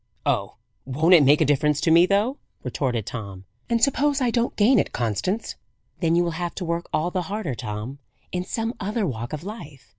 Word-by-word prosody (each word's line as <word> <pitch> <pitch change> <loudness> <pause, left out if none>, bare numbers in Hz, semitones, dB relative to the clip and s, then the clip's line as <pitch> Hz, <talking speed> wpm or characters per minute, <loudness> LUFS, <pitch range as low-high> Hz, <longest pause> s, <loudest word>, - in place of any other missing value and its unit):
"Oh, - - 0 0.3
won't 155 +7 +2
it 170 - +8
make 145 +3 +5
a - - +5
difference 145 +1 +2
to 165 - +2
me, 170 +2 +6
though!" 210 +8 +1 0.2
retorted 125 -3 -2
Tom. 100 -5 -7 0.2
"And 230 -1 +1
suppose 285 +1 +2
I 250 -3 +1
don't 235 0 0
gain 225 +3 +5
it, - - -1
Constance?" 125 - -1 0.5
"Then 165 -2 +2
you 175 - +4
will 170 - -1
have 175 -1 -3
to 185 - -4
work 170 +1 -2
all 170 +3 0
the 185 - -1
harder, 205 -9 -3
Tom, 110 +4 -6 0.3
in 180 0 -2
some 225 +4 -3
other 210 +2 -1
walk 120 -6 -4
of 155 +1 -5
life. 170 - -9
170 Hz, 205 wpm, -24 LUFS, 135-210 Hz, 0.5 s, it